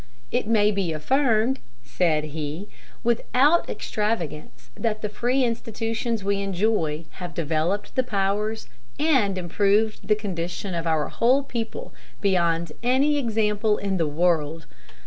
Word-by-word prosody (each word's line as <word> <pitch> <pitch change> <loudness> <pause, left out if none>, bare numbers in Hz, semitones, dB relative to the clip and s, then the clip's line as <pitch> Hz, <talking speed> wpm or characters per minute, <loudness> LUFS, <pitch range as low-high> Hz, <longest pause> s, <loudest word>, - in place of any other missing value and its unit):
"It 245 -3 0
may 210 -2 +4
be 195 -5 -1
affirmed," 245 - +2 0.2
said 155 +3 +1
he, 155 +5 -4 0.4
"without 255 +7 +3
extravagance 170 - -3
that 215 - -2
the 210 - -1
free 245 +5 +1
institutions 230 -1 -2
we 200 0 0
enjoy 185 -5 0
have 175 -3 -6
developed 165 +5 -1
the 260 - +3
powers 210 -1 -1 0.3
and 260 -11 +2
improved 205 +5 +1
the 210 - +4
condition 185 -2 -4
of 170 -1 -2
our 160 -2 +1
whole 255 +4 +3
people 245 - -5 0.3
beyond 170 -4 +1
any 270 +5 +3
example 215 -3 +1
in 195 -1 -1
the 165 -3 +1
world. 160 0 +1
205 Hz, 125 wpm, -24 LUFS, 170-230 Hz, 0.4 s, may